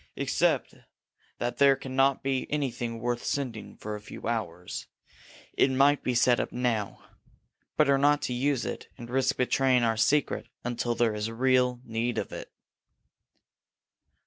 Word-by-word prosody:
Except - - +1 0.6
that 120 - -3
there 140 -1 +6
can 130 -1 -8
not 135 0 +3
be 135 -1 -1
anything 120 -5 -2
worth 120 +1 -2
sending 125 -6 -3
for 105 - -6
a 105 - -6
few 105 - -8
hours, 90 -7 -4 0.7
it - - +3
might 140 +2 +4
be 125 - -1
set 120 0 +4
up - - -2
now. 115 -5 -2 0.7
Better 140 -3 +4
not 145 +1 +3
to 125 - -1
use 130 0 0
it - - -5
and 120 -2 -9
risk 135 +1 +1
betraying 125 0 +3
our 115 -1 +1
secret 145 +6 +1 0.2
until 120 0 -1
there 115 -2 +2
is 105 +1 -3
real 125 +1 +2
need 115 +1 -2
of - - -3
it." - - -8
125 Hz, 150 wpm, -28 LUFS, 115-135 Hz, 0.7 s, there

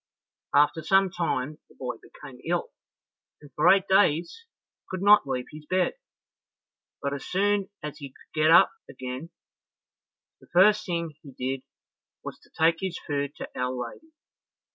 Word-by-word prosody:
After 150 +3 +4
some 195 +3 +3
time 155 -4 -2
the - - -21
boy 125 -3 -5
became 135 -4 -13
ill, 175 +1 -1 0.7
and 145 -1 -16
for 150 - +4
eight 195 0 +5
days 190 - +2 0.4
could 185 0 -4
not 205 -7 +6
leave 125 -2 -2
his 150 0 -11
bed; 185 +2 +1 1.1
but 140 0 -1
as 140 - -5
soon 200 +1 +1
as 150 -1 -6
he 140 -2 -7
could - - -23
get 155 - +5
up 165 - +7 0.2
again, 130 +4 -6 1.1
the - - -20
first 210 +4 +5
thing 170 -3 -2
he 140 -3 -13
did 130 +1 -3 0.6
was - - -7
to - - -24
take 165 +1 +2
his 190 -3 -3
food 140 -1 -2
to - - -6
Our 125 0 -1
Lady. 125 - -6
155 Hz, 155 wpm, -27 LUFS, 140-185 Hz, 1.1 s, up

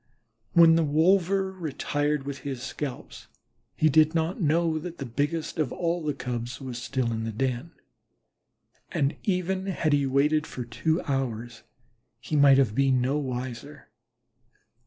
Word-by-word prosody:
When 165 -1 +7
the 165 - +3
wolver 185 +5 +2
retired 150 -4 -2
with 140 0 -5
his 135 -4 -5
scalps 140 -3 -6 0.5
he 155 - +3
did 155 +2 +4
not 165 +6 -1
know 160 0 +2
that 175 +1 -7
the 135 - -5
biggest 145 +7 -2
of 150 -6 0
all 170 0 -1
the 150 -2 -1
Cubs, 120 -2 -4
was 125 -3 -6
still 125 -1 -1
in 110 0 -3
the 115 - -3
den, 130 +7 -2 1.2
and 140 +1 0
even 190 0 -1
had 165 -5 0
he 140 -1 +2
waited 150 +3 +2
about - - -13
for 125 - -5
two 160 +8 -1
hours, 120 -4 -3 0.6
he 150 - -4
might 140 -2 +6
have 130 -6 +3
been 135 +1 +3
no 135 +4 0
wiser. 130 +1 -6
145 Hz, 155 wpm, -26 LUFS, 130-165 Hz, 1.2 s, When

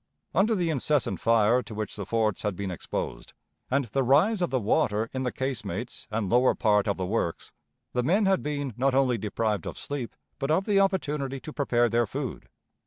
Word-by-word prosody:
Under 220 +3 +3
the 175 -4 0
incessant 135 - 0
fire 115 +2 +4
to 110 -2 -9
which 105 -1 -4
the 100 -2 -6
forts 110 -3 0
had 105 -3 -1
been 95 0 -4
exposed, 90 - -5 0.4
and 140 +1 +1
the 125 +5 -1
rise 155 - +3
of 175 - +1
the 130 - +1
water 110 0 +1
in 130 - -2
the 125 -1 -1
casemates 120 -4 -4
and 110 -2 -1
lower 125 +6 +4
part 105 -2 +2
of 100 - 0
the 95 - -2
works, 90 -4 -2 0.4
the 125 - +1
men 190 - +2
had 190 -1 +3
been 145 -3 -3
not 130 +1 +2
only 130 -4 +3
deprived 105 0 -1
of - - -6
sleep, 140 -5 -5 0.2
but 135 0 -2
of 175 +5 +2
the 205 -2 +3
opportunity 150 -9 0
to 155 - -8
prepare 120 -4 +2
their 115 0 +1
food. 130 +1 -5
125 Hz, 200 wpm, -27 LUFS, 110-145 Hz, 0.4 s, fire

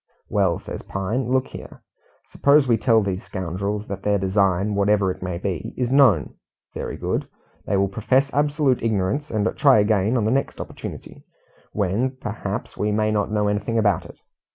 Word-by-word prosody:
"Well," 95 -4 +2
says - - -7
Pine, 110 +6 -3
"look 130 0 +2
here. - - -11 0.4
Suppose 140 -1 +3
we 120 - +4
tell 115 -1 +3
these 95 +1 -3
scoundrels 100 +2 -4
that 100 -1 -5
their 105 0 +1
design, 95 +1 +1
whatever 100 -1 +2
it - - -9
may 90 -1 -3
be, 90 -2 -4
is 125 -1 -1
known. 125 - +4 0.4
Very - - -5
good. - - -2 0.4
They 100 - +1
will 100 0 +2
profess 125 +7 +1
absolute 145 -2 +1
ignorance, 110 +6 -1
and 110 -1 0
try 140 -5 +5
again 105 +2 +2
on 110 - 0
the 110 - +1
next 135 +2 -1
opportunity, - - -8 0.5
when, 105 +7 -1
perhaps, 105 -3 -5
we 105 +1 -1
may 110 +1 +1
not 105 -2 0
know 105 -1 0
anything 105 +3 -1
about 105 -5 +2
it. - - -13
105 Hz, 175 wpm, -22 LUFS, 100-120 Hz, 0.5 s, try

